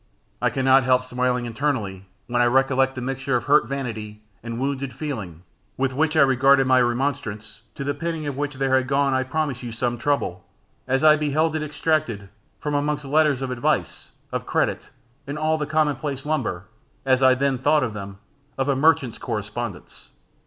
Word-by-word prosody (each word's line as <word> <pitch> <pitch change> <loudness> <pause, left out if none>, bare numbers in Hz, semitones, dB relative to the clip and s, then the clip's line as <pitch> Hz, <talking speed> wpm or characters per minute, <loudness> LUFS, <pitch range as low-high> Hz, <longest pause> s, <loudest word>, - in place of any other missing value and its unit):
I - - +3
cannot 135 0 +4
help 130 0 +3
smiling 125 -1 -1
internally 115 -7 -2 0.2
when 120 0 0
I 120 - +4
recollect 135 +1 +2
the 130 - -5
mixture 135 +1 -2
of 120 - 0
hurt 145 +4 +4
vanity, 110 -6 -5 0.2
and 115 0 -5
wounded 135 0 -2
feeling, 100 - -6 0.3
with 130 0 0
which 155 +3 +1
I - - +7
regarded 135 0 +5
my 130 0 +4
remonstrance, 120 -4 -2
to - - -5
the 145 +1 -1
penning 160 +1 -4
of 145 -2 -3
which 145 0 -3
there 135 0 0
had 130 -1 +1
gone, 140 0 +2
I 130 - +2
promise 135 -1 -2
you, 120 -2 -6
some 120 +1 -2
trouble, 120 -9 -1 0.4
as 135 +2 +1
I 155 0 +7
beheld 155 +2 +1
it 155 - -1
extracted 150 -9 -1 0.3
from 150 - -3
amongst 145 0 -1
letters 145 -2 +2
of 130 - -3
advice, 125 -1 -1 0.2
of - - -4
credit, - - 0 0.5
and 140 +2 -4
all 155 +1 +1
the 150 - -2
commonplace 145 -3 -1
lumber, 125 - -2 0.4
as 130 -1 +3
I 130 -1 +6
then 135 -1 0
thought 145 +2 +3
them, 100 -1 -7 0.4
of 135 0 0
a 140 - +2
merchant's 135 -5 +2
correspondence. 105 -1 -6
135 Hz, 180 wpm, -23 LUFS, 120-145 Hz, 0.5 s, I